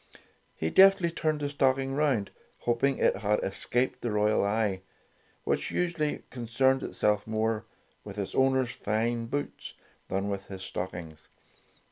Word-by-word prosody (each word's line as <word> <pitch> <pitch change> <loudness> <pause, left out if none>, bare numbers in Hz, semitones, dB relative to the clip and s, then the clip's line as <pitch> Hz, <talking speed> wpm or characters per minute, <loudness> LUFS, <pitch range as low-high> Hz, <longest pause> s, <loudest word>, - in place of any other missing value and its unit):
He 80 - -2
deftly 190 -3 +6
turned 155 -2 -1
the 145 - -1
stocking 135 -1 +1
round, 135 -8 +1 0.3
hoping 130 +3 +1
it - - +2
had 105 0 +1
escaped 120 +6 -1
the 120 - -1
royal 105 0 +2
eye, 100 -2 0 0.6
which - - -1
usually 165 -4 -1
concerned 130 +2 +1
itself 105 0 0
more 110 0 0 0.4
with 100 -1 -9
its 100 -2 -3
owner's 130 -2 +2
fine 115 +2 -1
boots 145 +4 -4 0.3
than 95 +1 -1
with 100 -1 -4
his 95 -1 -8
stockings. 85 -4 -6
115 Hz, 135 wpm, -29 LUFS, 105-135 Hz, 0.6 s, deftly